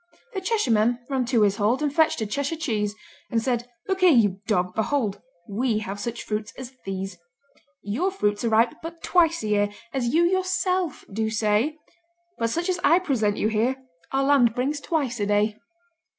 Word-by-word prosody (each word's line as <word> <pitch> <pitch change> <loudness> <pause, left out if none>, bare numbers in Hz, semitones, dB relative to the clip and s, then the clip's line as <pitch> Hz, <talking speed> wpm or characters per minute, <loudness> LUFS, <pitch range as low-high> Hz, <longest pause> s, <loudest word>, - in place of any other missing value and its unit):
The 385 - -3
Cheshireman 240 - +2
ran 260 -2 +1
to 235 -3 +3
his 200 -1 +2
hold 225 +8 +1
And 290 -2 0
fetched 315 -6 +3
a - - 0
Cheshire 280 +9 -2
cheese, 215 -10 -1 0.3
And 230 - +1
said, 240 0 -1 0.2
"Look 385 -1 0
here, 370 -1 +6
you 205 - +3
dog, 180 -4 +1
behold! 220 -3 -1 0.3
We 220 +2 0
have 205 -1 -4
such 235 +3 -4
fruits 210 0 -3
as 260 0 -8
these. 195 -1 -5 0.6
Your 245 - 0
fruits 205 - -1
are 230 - +1
ripe 225 +2 +3
but 330 +1 -8
twice 335 -4 +3
a - - -2
year, 205 -1 +2 0.2
As 260 -3 0
you 330 +4 +4
yourself 370 -2 0
do 220 +1 0
say, 220 +7 +1 0.6
But 230 0 +1
such 340 +9 -1
as 365 -1 0
I 335 - +6
present 245 - 0
you 215 - +1
here 225 +4 +1 0.4
Our 270 0 +1
land 270 -5 +4
brings 280 +4 -1
twice 275 -9 -1
a 205 - 0
day." 210 +1 +1
235 Hz, 185 wpm, -25 LUFS, 210-310 Hz, 0.6 s, here